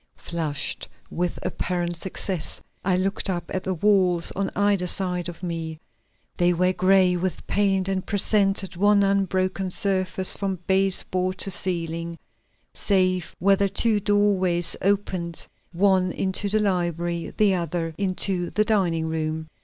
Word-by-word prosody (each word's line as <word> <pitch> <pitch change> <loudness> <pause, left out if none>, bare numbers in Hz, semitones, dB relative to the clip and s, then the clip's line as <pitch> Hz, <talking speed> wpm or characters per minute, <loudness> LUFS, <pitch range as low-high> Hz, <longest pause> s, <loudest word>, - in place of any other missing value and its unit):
Flushed 155 -4 -2 0.2
with 175 0 -2
apparent 175 -1 -2
success, 180 -1 -1 0.2
I 180 -1 +1
looked 195 +2 -1
up 175 -2 -3
at 185 - -1
the 185 0 -3
walls 180 -2 +3
on 195 0 -2
either 200 -3 +1
side 180 -1 -1
of 175 +1 -11
me. 165 -2 -4 0.6
They 175 0 +3
were 180 +2 +1
gray 185 -1 +3
with 180 +1 -3
paint 195 -2 +1
and 190 -1 -1
presented 200 -2 +1
one 205 +2 +3
unbroken 190 -1 0
surface 185 0 0
from 195 -1 -3
base 190 0 +4
board 185 0 -2
to 195 - +1
ceiling, 170 -2 -3 0.6
save 185 -3 0
where 195 +2 +4
the 200 0 +1
two 220 +1 +2
doorways 195 -4 +2
opened, 185 -4 -1 0.3
one 185 0 +2
into 190 +3 -1
the 215 - +1
library, 175 -4 -1
the 205 -2 +4
other 170 -2 -3
into 185 -1 -1
the 215 - 0
dining 180 -7 +1
room. 160 0 -3
185 Hz, 140 wpm, -24 LUFS, 175-195 Hz, 0.6 s, base